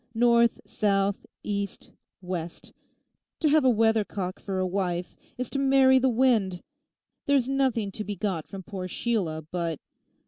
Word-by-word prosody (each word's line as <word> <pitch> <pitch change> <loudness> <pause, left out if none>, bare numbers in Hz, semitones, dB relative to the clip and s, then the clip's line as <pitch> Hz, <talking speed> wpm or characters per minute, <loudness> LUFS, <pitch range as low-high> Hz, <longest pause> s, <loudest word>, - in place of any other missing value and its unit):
North, 235 0 +4
south, 200 -1 0 0.2
east, 200 -1 -4 0.3
west—to 180 - -6
have 305 0 +4
a 260 - +5
weathercock 215 -5 +1
for 195 -2 -4
a 185 - +1
wife 180 -2 -2 0.2
is 250 0 -3
to 275 - -1
marry 265 -1 +5
the 260 +1 +3
wind. 225 -7 +2 0.6
There's 275 -3 +3
nothing 260 -7 0
to 215 - -5
be 205 0 -4
got 185 -5 -2
from 195 -1 -8
poor 190 -2 -6
Sheila 180 -7 -2
but... 170 -4 -2
205 Hz, 140 wpm, -27 LUFS, 185-245 Hz, 0.6 s, a